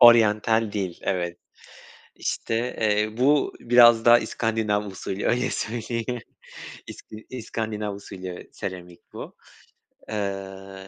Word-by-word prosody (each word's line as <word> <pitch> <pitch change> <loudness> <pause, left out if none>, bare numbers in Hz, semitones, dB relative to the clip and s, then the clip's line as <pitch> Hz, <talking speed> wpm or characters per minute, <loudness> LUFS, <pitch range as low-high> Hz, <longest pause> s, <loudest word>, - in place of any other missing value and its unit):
oryantal 110 -2 +6
değil 95 -4 -3
evet, 85 -2 -1 0.8
işte, 115 - -2 0.3
eee, 105 0 +1
bu 140 +3 +3
biraz 120 -1 +7
da 120 0 +8
iskandinav 110 -3 -1
usulü 95 0 -4
öyle 125 +1 +2
söyleyeyim. 115 +1 -3 0.7
İski 110 0 -11
iskandinav 110 -4 -3
usulü 95 -2 -8
seramik 90 -2 -7
bu. - - -8 0.7
Eee, 95 -2 -5
105 Hz, 100 wpm, -25 LUFS, 95-115 Hz, 0.8 s, da